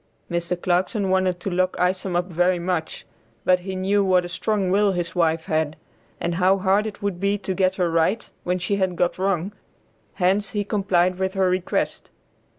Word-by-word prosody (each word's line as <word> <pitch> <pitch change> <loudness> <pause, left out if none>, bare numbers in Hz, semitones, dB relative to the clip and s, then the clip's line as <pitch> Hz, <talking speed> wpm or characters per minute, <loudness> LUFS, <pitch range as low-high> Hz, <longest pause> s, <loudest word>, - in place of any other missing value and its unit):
Mr. 170 +1 -1
Clarkson 185 +3 0
wanted 185 -1 +1
to 195 - -4
lock 185 +1 +1
Isom 185 0 0
up 175 0 +1
very 180 +1 +1
much, 170 -2 -3 0.4
but 185 0 +4
he 190 +1 -6
knew 195 +2 +1
what 185 -2 +3
a - - -6
strong 190 +1 -1
will 200 0 +3
his 175 -2 -3
wife 165 -2 +1
had, 155 -1 0 0.4
and 170 - -1
how 185 +3 +3
hard 195 +3 +2
it 205 -1 -8
would 200 -3 -2
be 200 +1 +1
to 190 -1 -3
get 185 0 +1
her 180 -3 0
right 165 +7 +1 0.2
when 180 +1 0
she 185 +3 -1
had 190 -2 0
got 175 +1 0
wrong, 190 0 0 0.6
hence 195 +3 +1
he 205 -1 -2
complied 185 -3 +1
with 190 +1 -1
her 190 -1 +2
request. 185 0 -2
185 Hz, 190 wpm, -23 LUFS, 175-195 Hz, 0.6 s, but